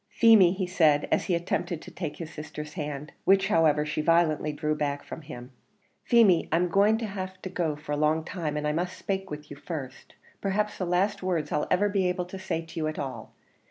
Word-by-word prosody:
"Feemy," 215 -6 +6
he 190 -1 -2
said, 160 -5 +3
as - - +2
he 180 - +1
attempted 170 -1 -2
to - - -11
take 160 -5 -5
his 165 -2 -7
sister's 150 0 -7
hand 150 -2 -5
which, 195 0 +4
however, 155 -5 +3
she 155 0 -2
violently 155 -2 +2
drew 150 +1 -1
back 145 -2 -2
from - - -8
him 130 -4 -10 0.5
"Feemy, 215 -8 +4
I'm 175 +2 +2
going 205 +5 +4
to 225 - -3
lave 190 -1 -4
you 175 -5 -1
a 145 - 0
long 155 +2 +1
time, 160 -4 -3
and 150 0 -1
I - - +1
must 175 +4 -2
spake 195 0 -3
to 150 -2 -6
you 145 - -9
first, 140 -4 -7 0.3
perhaps 210 +2 -1
the 185 - -1
last 190 +4 +1
words 180 -5 -1
I'll 150 - 0
ever 200 +3 +3
be 195 -3 +1
able 180 0 -2
to 190 +2 -8
say 165 -3 -3
to 165 - -7
you 155 - 0
at 155 - -4
all. 130 -5 -6
165 Hz, 215 wpm, -27 LUFS, 150-185 Hz, 0.5 s, Feemy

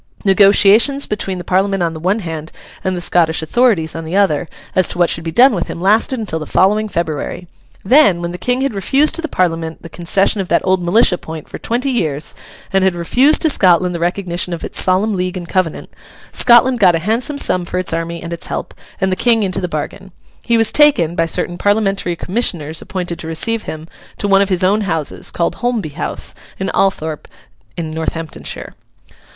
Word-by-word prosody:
Negotiations 205 +7 +5
between 195 -3 -4
the 175 - -6
Parliament 195 0 0
on 165 -1 -1
the 160 - -7
one 190 +7 0
hand 160 -3 -6 0.3
and 185 -1 -1
the - - -4
Scottish 165 -2 +1
authorities 175 -4 +1
on 165 - -5
the 160 +3 -5
other, 180 -5 +2 0.3
as 185 - +3
to - - -3
what 175 -1 +2
should 165 - -2
be 165 - -3
done 250 +9 +5
with 175 -4 -2
him, - - -6
lasted 215 +7 +2
until 205 -8 -3
the 155 - -7
following 210 +3 +2
February. 170 0 -4 0.4
Then, 250 - +5
when 170 0 -4
the 180 - -8
King 250 +1 -1
had 275 -3 -1
refused 270 +10 +2
to 335 - -1
the 320 - -3
Parliament 165 - -2
the 165 - -9
concession 190 +5 +1
of 185 - -5
that 170 - +1
old 185 -1 +2
militia 180 +1 +3
point 160 -1 -9
for - - -9
twenty 250 +4 -2
years, 155 - -2 0.4
and 195 0 +3
had 190 -2 +2
refused 255 - +2
to 320 - +3
Scotland 180 -3 +3
the 170 - -4
recognition 175 0 -2
of 170 - -6
its - - +2
Solemn 190 +4 +2
League 185 0 -2
and 175 -1 -7
Covenant, 185 -4 -2 0.4
Scotland 245 +1 +4
got 180 -5 +5
a 165 +1 -4
handsome 240 +7 0
sum 185 -9 +1
for 175 - -5
its 185 -2 0
army 165 +1 -4
and 170 0 -5
its 170 - -6
help, - - -5 0.3
and 190 -1 0
the - - +1
King 230 +1 +2
into 190 0 -2
the 180 - -2
bargain. 170 +4 -6 0.3
He 235 - +1
was 225 -1 +2
taken, 230 - +4
by 165 -1 +1
certain 175 +2 -2
Parliamentary 195 -4 0
commissioners 170 -6 -2
appointed 180 -3 -5
to 160 - -7
receive 215 +8 -2
him, 155 0 -7 0.3
to 205 - -2
one 195 0 +4
of 200 - 0
his 185 -1 +1
own 200 +4 +2
houses, 165 -7 -2
called 170 - -2
Holmby 240 -9 -2
House, 165 - -2 0.3
near 190 0 -2
Althorpe, 160 -6 -1 0.5
in 160 -2 -4
Northamptonshire. 160 0 -5
185 Hz, 205 wpm, -16 LUFS, 170-210 Hz, 0.5 s, Negotiations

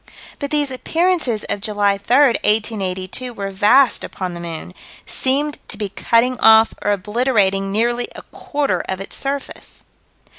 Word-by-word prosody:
But 280 - -3
these 290 -2 0
appearances 315 - 0
of 205 - -3
July 205 -1 +1
3, 240 +5 +1
1882, 210 +1 -1
were 195 -1 -4
vast 210 +7 +4
upon 185 -2 -5
the 170 - -7
moon 170 +1 -7 0.3
"seemed 285 +3 -1
to 210 - -6
be 205 -2 -3
cutting 235 +5 +1
off 220 0 +6
or - - -1
obliterating 205 -1 +1
nearly 240 +3 0
a - - -9
quarter 290 -1 -2
of 190 - -2
its 195 - -7
surface." 275 0 -5
220 Hz, 145 wpm, -19 LUFS, 195-260 Hz, 0.3 s, off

